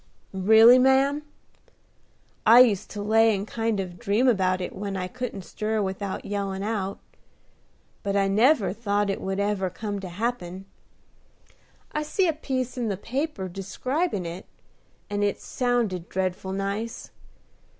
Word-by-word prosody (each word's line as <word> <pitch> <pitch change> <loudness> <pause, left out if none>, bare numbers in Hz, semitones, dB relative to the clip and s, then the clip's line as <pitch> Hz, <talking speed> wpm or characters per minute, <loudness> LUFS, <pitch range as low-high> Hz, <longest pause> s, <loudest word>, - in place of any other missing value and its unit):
"Really, 220 +6 +7
ma'am? 270 +3 +3 1.2
I 230 +3 +8
used 215 -7 +3
to 205 0 -5
lay 220 +1 +4
and 200 +2 -4
kind 225 -2 -1
of 180 -2 -5
dream 210 +8 +1
about 185 -5 +2
it 180 - -5
when 195 0 -4
I 180 -1 -3
couldn't 245 -3 -5
stir 215 +5 -2
without 195 0 -3
yellin' 195 -1 -3
out; 200 -3 -2 1.0
but 200 -1 -2
I 195 -1 +3
never 220 +2 +3
thought 205 -2 0
it - - -4
would 195 +1 -2
ever 200 -2 0
come 205 +2 -5
to 190 -2 -7
happen. 190 -2 -4 1.3
I 300 - -2
see 355 +5 +1
a 325 - +2
piece 260 -4 -3
in 235 - -1
the 200 -3 -2
paper 255 - -3
describing 200 - -2
it, 170 +2 -7 0.6
and 205 0 -1
it 205 -1 0
sounded 235 -9 -1
dreadful 190 0 -2
nice. 200 +4 -4
205 Hz, 145 wpm, -25 LUFS, 190-240 Hz, 1.3 s, I